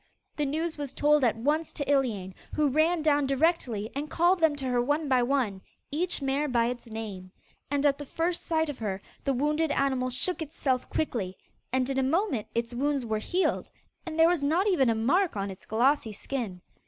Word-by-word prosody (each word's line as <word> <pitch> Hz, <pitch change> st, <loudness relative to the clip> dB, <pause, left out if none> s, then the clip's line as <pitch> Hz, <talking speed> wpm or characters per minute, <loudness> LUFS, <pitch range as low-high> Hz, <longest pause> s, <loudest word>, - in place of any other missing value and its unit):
The 295 Hz, -2 st, 0 dB
news 315 Hz, +2 st, -2 dB
was 280 Hz, -2 st, -5 dB
told 295 Hz, -1 st, +4 dB
at 235 Hz, -3 st, +3 dB
once 300 Hz, +7 st, 0 dB
to 285 Hz, -, -3 dB
Iliane, 230 Hz, -10 st, +1 dB, 0.2 s
who 300 Hz, -2 st, +3 dB
ran 315 Hz, +4 st, +2 dB
down 290 Hz, -2 st, +3 dB
directly 270 Hz, -7 st, +1 dB
and 290 Hz, +2 st, -3 dB
called 350 Hz, +2 st, +3 dB
them 320 Hz, -3 st, +3 dB
to 275 Hz, -2 st, -5 dB
her 250 Hz, -1 st, +1 dB
one 290 Hz, +4 st, 0 dB
by 260 Hz, -2 st, +3 dB
one, 240 Hz, -7 st, 0 dB, 0.3 s
each 330 Hz, 0 st, -1 dB
mare 275 Hz, +2 st, +1 dB
by 235 Hz, -3 st, +2 dB
its 245 Hz, -1 st, -6 dB
name. 210 Hz, -5 st, -7 dB, 0.4 s
And 285 Hz, 0 st, 0 dB
at 280 Hz, -1 st, +3 dB
the 290 Hz, -, -6 dB
first 335 Hz, +4 st, -1 dB
sight 320 Hz, -1 st, +1 dB
of 290 Hz, -3 st, -5 dB
her 200 Hz, -4 st, -2 dB, 0.3 s
the 275 Hz, -, +2 dB
wounded 300 Hz, +4 st, +1 dB
animal 265 Hz, -3 st, +1 dB
shook 345 Hz, +8 st, -1 dB
itself 275 Hz, -4 st, -1 dB
quickly, 205 Hz, -11 st, -2 dB, 0.3 s
and 255 Hz, 0 st, +1 dB
in 270 Hz, 0 st, 0 dB
a -, -, +2 dB
moment 275 Hz, -, 0 dB
its 235 Hz, +1 st, -1 dB
wounds 275 Hz, +1 st, 0 dB
were 220 Hz, -1 st, -1 dB
healed, 360 Hz, -, 0 dB, 0.3 s
and 325 Hz, -2 st, -6 dB
there 325 Hz, 0 st, +7 dB
was 345 Hz, -3 st, +2 dB
not 320 Hz, +7 st, +2 dB
even 330 Hz, -, +3 dB
a 225 Hz, -, +2 dB
mark 315 Hz, -, +2 dB
on 195 Hz, 0 st, -2 dB
its 190 Hz, -, -13 dB
glossy 235 Hz, 0 st, +2 dB
skin. 210 Hz, -5 st, -4 dB
275 Hz, 205 wpm, -28 LUFS, 240-310 Hz, 0.4 s, there